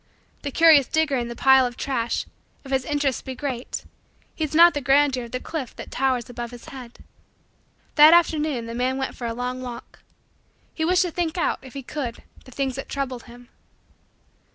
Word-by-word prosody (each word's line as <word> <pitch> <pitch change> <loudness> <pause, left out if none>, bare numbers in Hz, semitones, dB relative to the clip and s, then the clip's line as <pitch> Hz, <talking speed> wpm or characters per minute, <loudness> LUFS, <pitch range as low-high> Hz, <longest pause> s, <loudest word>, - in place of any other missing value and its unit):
The 285 - -3
curious 305 -3 +6
digger 315 -3 +1
in 240 -1 -2
the 235 - -7
pile 265 +1 +5
of 245 -1 -3
trash, 240 -4 -2 0.4
if 270 - -9
his 265 -1 0
interest 290 -3 -1
be 260 - -6
great, 255 -3 -5 0.5
heeds 310 -2 -3
not 340 +1 +8
the 290 - -2
grandeur 270 -1 +3
of 235 - -13
the 255 - -3
cliff 280 -3 -6
that - - -9
towers 255 -2 0
above 240 -1 -6
his 240 -1 -12
head. 250 -3 -11 0.9
That 300 +1 +8
afternoon 310 -7 +2
the 230 - -6
man 255 +2 -1
went 265 -1 -3
for 240 - -5
a 230 - -3
long 250 +1 -4
walk. 245 -2 -9 0.7
He 320 - -3
wished 360 +2 +3
to 355 - -3
think 345 0 -2
out, 340 - 0
if 260 -1 -13
he 275 - -6
could, 245 -3 -5 0.2
the 255 - -14
things 265 0 -2
that 270 - -6
troubled 260 -3 -4
him. 245 0 -15
265 Hz, 195 wpm, -24 LUFS, 245-295 Hz, 0.9 s, not